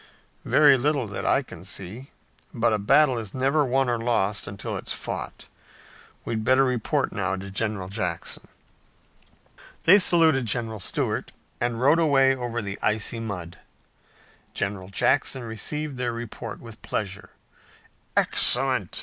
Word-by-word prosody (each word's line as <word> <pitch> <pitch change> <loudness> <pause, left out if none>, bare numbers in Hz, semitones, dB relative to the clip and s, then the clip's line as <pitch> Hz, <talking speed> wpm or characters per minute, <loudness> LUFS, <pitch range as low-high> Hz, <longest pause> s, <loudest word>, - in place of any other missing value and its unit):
"Very 145 -3 +6
little 140 -1 +1
that 100 -2 -5
I 140 - +3
can 90 -9 -12
see, 100 +7 -7 0.5
but 115 -1 +2
a 105 - +1
battle 130 +5 +4
is 110 -4 -7
never 135 +4 +2
won 135 0 +1
or 120 -1 0
lost 105 -3 0
until 100 0 -5
it's - - -5
fought. - - -5 0.8
We'd 110 -1 -2
better 130 +3 +4
report 125 -4 0
now 95 - -1
to 95 +1 -8
General 105 -2 -2
Jackson." 95 -4 -3 1.4
They 190 +5 +7
saluted 160 - +3
General 110 -1 -3
Stuart, - - -2 0.3
and 120 -1 -1
rode 145 +6 +4
away 135 -4 +4
over 120 -2 -4
the 100 0 -6
icy 110 +2 0
mud. 90 -6 -6 1.0
General 100 -2 -3
Jackson 130 +5 +1
received 135 +6 -4
their 125 -1 -1
report 115 -1 -7
with 115 -2 -12
pleasure. 100 -2 -4 0.9
"Excellent! - - +3
115 Hz, 135 wpm, -25 LUFS, 105-135 Hz, 1.4 s, They